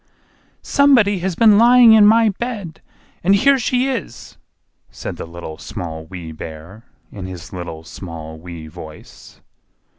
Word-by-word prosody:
"SOMEBODY 240 -9 +3
HAS 180 0 -3
BEEN 215 0 +5
LYING 240 -1 +7
IN 210 -2 +7
MY 225 +1 +5
BED—AND 200 -4 -4
HERE 270 +6 +3
SHE 250 +2 0
IS!" 255 - -6 0.5
said - - -7
the - - -7
Little, 85 -2 -9
Small, 80 -2 -7
Wee 85 -3 -8
Bear, 80 +8 -10 0.3
in 95 -3 -8
his 90 -3 -10
little, 85 -3 -7
small, 80 -2 -9
wee 85 -1 -9
voice. 80 -1 -13
100 Hz, 130 wpm, -19 LUFS, -, 0.5 s, LYING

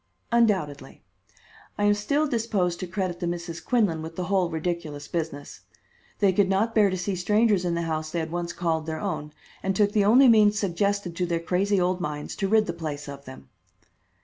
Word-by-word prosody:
"Undoubtedly. 195 -12 0 0.7
I 205 - -1
am 205 0 +5
still 280 +9 0
disposed 215 -9 -1
to 185 - -4
credit 185 -1 -3
the 175 - -2
Misses 170 -1 -4
Quinlan 205 -10 +1
with 160 +1 -8
the 180 - -3
whole 185 -1 +1
ridiculous 160 -3 -4
business. 155 -4 -5 0.6
They 200 -2 +3
could 190 0 +2
not 210 +4 +1
bear 210 -2 +4
to 185 - -2
see 185 +2 -2
strangers 210 +1 +2
in 170 -1 0
the 170 - -1
house 155 -1 -3
they 170 - -4
had 160 0 -4
once 175 0 -3
called 165 -2 -2
their 160 0 -3
own, 165 -7 -4 0.3
and 195 0 -1
took 205 +1 +3
the 205 -1 +2
only 250 +6 +6
means 215 -3 +5
suggested 200 -2 -1
to 180 - 0
their 170 -1 0
crazy 190 +4 +1
old 180 0 0
minds 150 -3 -4
to 195 - 0
rid 215 +1 +3
the 170 - -3
place 150 -3 -5
of 140 0 -9
them." 130 0 -12
180 Hz, 200 wpm, -25 LUFS, 165-205 Hz, 0.7 s, only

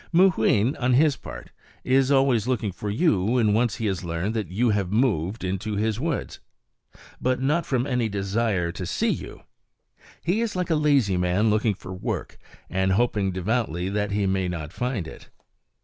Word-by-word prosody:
Mooween, 150 - +3
on 125 -1 +1
his 145 +1 +4
part, - - -10 0.3
is 130 +1 +3
always 135 -5 +3
looking 115 -5 0
for 105 +3 -5
you 110 - +2
when 110 0 +2
once 115 0 +1
he 115 - -4
has 95 -3 -1
learned 85 +5 -2
that 110 -7 -3
you 110 +6 +1
have 100 -3 -1
moved 105 -4 0
into 95 +3 -2
his 110 +1 0
woods. 160 0 -3 0.8
But 130 0 +1
not 150 +6 0
from 125 -2 0
any 125 -5 0
desire 100 -2 -1
to 90 0 -6
see - - 0
you! - - -6 0.8
He 185 +7 +1
is 230 -4 -2
like 180 -1 -1
a - - +4
lazy 140 -11 +3
man 90 +5 +2
looking 110 -1 +1
for 95 - -9
work, 90 - -4 0.3
and 95 0 0
hoping 105 -3 +1
devoutly 95 -2 -1
that 105 0 -1
he 100 0 0
may 95 -1 0
not 85 -2 -5
find 125 -9 -2
it. - - -12
110 Hz, 180 wpm, -25 LUFS, 95-130 Hz, 0.8 s, his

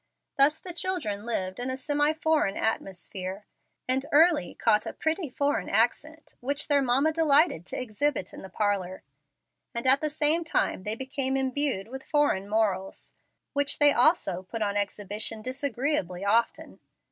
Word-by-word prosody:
Thus 285 +3 +4
the 360 - -7
children 295 - -2
lived 185 -3 -3
in 250 +1 -2
a 260 - -3
semi 290 +2 +1
foreign 315 -9 0
atmosphere, 190 -2 -3 0.4
and 260 +1 +1
early 315 - +3
caught 210 0 +2
a - - -5
"pretty 320 0 -2
foreign 280 -6 -1
accent," 300 +9 0
which 285 +4 -1
their 285 -2 +3
mamma 270 +4 +2
delighted 310 - +3
to - - -4
exhibit 255 -2 -2
in - - -10
the 190 - -10
parlor; 190 -2 -2 0.7
and 235 - -3
at 265 +2 +5
the 305 - -1
same 310 +2 +3
time 320 - -1
they 210 +1 -1
became 265 +1 -2
imbued 265 -6 -1
with 265 +3 -8
foreign 285 -10 0
morals, 200 -3 -2 0.4
which 285 0 0
they 290 -1 +5
also 245 - +3
put 215 +4 -5
on 200 -1 -2
exhibition 205 +2 -3
disagreeably 255 - -2
often. 230 +3 0
260 Hz, 155 wpm, -27 LUFS, 205-295 Hz, 0.7 s, at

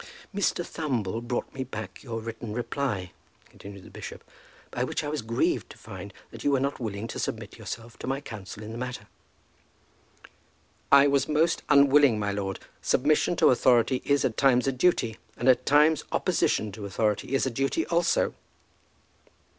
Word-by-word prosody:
"Mr. 195 -3 0
Thumble 115 - -2
brought 120 +1 -3
me 135 - -3
back 110 -4 -7
your 115 -4 -5
written 115 -1 -6
reply," 120 -7 -2 0.4
continued 100 -1 -11
the - - -14
bishop, - - -8 0.5
"by - - -1
which - - -2
I - - -3
was 150 -1 -2
grieved 115 +1 0
to - - -12
find - - -9 0.2
that - - -9
you - - +2
were 140 -2 +3
not 140 +2 -1
willing 110 -2 -4
to - - -5
submit - - -4
yourself 115 +1 -7
to - - -6
my 135 +1 -1
counsel 105 -4 -9
in 110 - -7
the 115 - -6
matter." 125 0 -5 1.9
"I 140 0 +8
was 140 -1 +2
most 160 +3 +2
unwilling, 140 -3 +6
my 105 -1 -1
lord. 100 -1 -3 0.2
Submission - - +2
to - - +5
authority 125 +1 +3
is 140 -1 +2
at 110 - -1
times 130 -3 +4
a 135 - +2
duty; 130 -5 +1 0.2
and 120 - -2
at 130 -1 +4
times 150 +2 +5
opposition 105 0 +1
to 100 0 -7
authority 105 +5 0
is 135 - +2
a 130 - -1
duty 135 - 0
also." 170 0 +1
125 Hz, 170 wpm, -27 LUFS, 110-140 Hz, 1.9 s, I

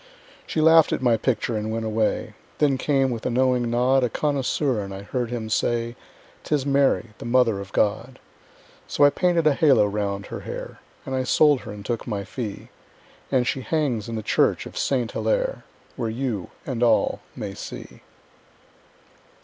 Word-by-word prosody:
She 155 - -1
laughed 160 0 +6
at - - -1
my 120 -2 +4
picture 115 0 -1
and 110 0 -2
went 115 0 -2
away. 110 0 -1 0.2
Then 140 -3 +2
came, 135 -2 +2
with 115 -2 -4
a - - 0
knowing 125 -1 +2
nod, 125 +3 +3
A 125 - +1
connoisseur, 140 -3 0
and 100 -1 -6
I 95 +1 -7
heard 120 +2 -3
him 120 -2 -4
say; 115 +2 0 0.5
"'Tis 145 -3 0
Mary, 140 -5 +2
the - - -8
Mother 120 -4 +3
of 100 0 -8
God." 115 +5 0 0.7
So - - +1
I 145 - +7
painted 175 -2 +1
a 155 - +5
halo 135 -8 +4
round 100 -1 -2
her - - -6
hair, - - -7 0.3
And 135 - -5
I 130 0 0
sold 145 +2 +4
her 115 - -9
and 105 -1 -9
took 120 -1 -3
my 100 -4 -2
fee, 105 0 -6 0.6
And 130 -2 +2
she 130 - -1
hangs 130 -8 -1
in 115 - -4
the 110 - -4
church - - +2
of - - -10
Saint 125 -4 0
Hillaire, - - -1 0.3
Where 115 -3 -2
you 115 -5 -3 0.2
and 125 -4 -3
all 115 -2 +3 0.2
may 100 -2 -5
see. - - -9
120 Hz, 180 wpm, -24 LUFS, 110-135 Hz, 0.7 s, I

